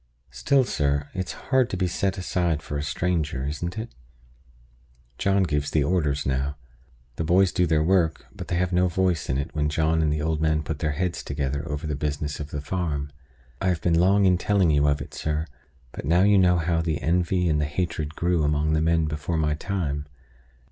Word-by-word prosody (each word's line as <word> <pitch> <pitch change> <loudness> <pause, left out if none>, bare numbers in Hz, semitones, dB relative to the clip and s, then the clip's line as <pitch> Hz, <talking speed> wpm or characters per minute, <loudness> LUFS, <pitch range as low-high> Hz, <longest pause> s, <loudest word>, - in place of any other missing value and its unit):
Still, 130 - +2
sir, 70 - -1
it's 95 -1 -3 0.2
hard 130 -2 +4
to 95 - -3
be 90 - +1
set 95 +2 -1
aside 85 -4 -1
for 75 - -6
a 70 - -1
stranger; 75 -4 -1
isn't 85 +7 -4
it? 110 +2 -5 1.3
John 100 -1 +2
gives 75 -4 -1
the 75 - +2
orders 75 -4 0
now. 70 +2 -1 0.6
The - - -1
boys 90 +3 +4
do 90 - +1
their 80 -1 +2
work; 85 -2 +1
but - - -8
they - - -1
have 90 +1 0
no 90 +1 +3
voice 90 -1 0
in 65 - +1
it 70 - -4
when 75 -1 0
John 80 +1 +1
and 75 -1 +1
the 75 - 0
old 80 +1 -1
man 80 -1 +1
put 75 -1 -4
their 75 -1 0
heads 90 +3 -2
together 70 0 -3
over 75 +2 -4
the 75 -2 -2
business 75 0 -3
of 75 -1 -6
the 75 - -4
farm. 75 -3 -3 0.5
I 95 - 0
have 90 -3 +1
been 85 - +1
long 100 +3 +4
in 90 -2 +4
telling 95 -5 +2
you 75 0 +3
of 70 0 +1
it, - - -14
sir, 75 0 -2 0.5
but - - -7
now 85 +5 +3
you 100 -1 +5
know 90 -1 +4
how 85 0 +1
the 80 -3 -1
envy 90 +2 +1
and 75 -2 +2
the - - +1
hatred 80 -1 -3
grew 85 -1 +1
among 75 +1 +1
the 80 - +2
men 80 0 +2
before 75 +2 -2
my 75 -1 +1
time. 75 -4 -3
80 Hz, 210 wpm, -25 LUFS, 75-90 Hz, 1.3 s, you